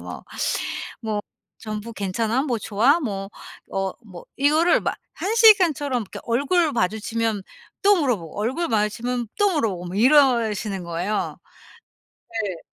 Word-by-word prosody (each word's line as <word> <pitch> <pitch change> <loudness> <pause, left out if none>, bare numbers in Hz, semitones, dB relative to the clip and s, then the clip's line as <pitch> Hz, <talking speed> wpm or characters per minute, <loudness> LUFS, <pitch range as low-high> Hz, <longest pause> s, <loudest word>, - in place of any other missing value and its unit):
뭐. - - -8 0.8
뭐 215 -2 -2 0.4
"전부 215 +1 -6
괜찮아?" 220 +6 -1
뭐 245 -6 -1
"좋아?" 235 - +2
뭐 195 -8 -4 0.4
어 195 -1 -1
뭐 180 -5 -11
이거를 310 +5 +4
막 - - -2 0.2
1 420 +4 -1
시간처럼 335 - +5
이렇게 195 - -9
얼굴 290 +7 +1
마주치면 220 0 -1 0.4
또 400 -2 +5
물어보고 205 - -2
얼굴 260 +11 -1
마주치면 230 +2 -1
또 410 -1 +4
물어보고 195 - -1
뭐 180 - -5
이러시는 225 -7 +3
거예요. 175 +5 -2 0.9
네. 205 -7 -4
225 Hz, 260 characters per minute, -23 LUFS, 205-280 Hz, 0.9 s, 시간처럼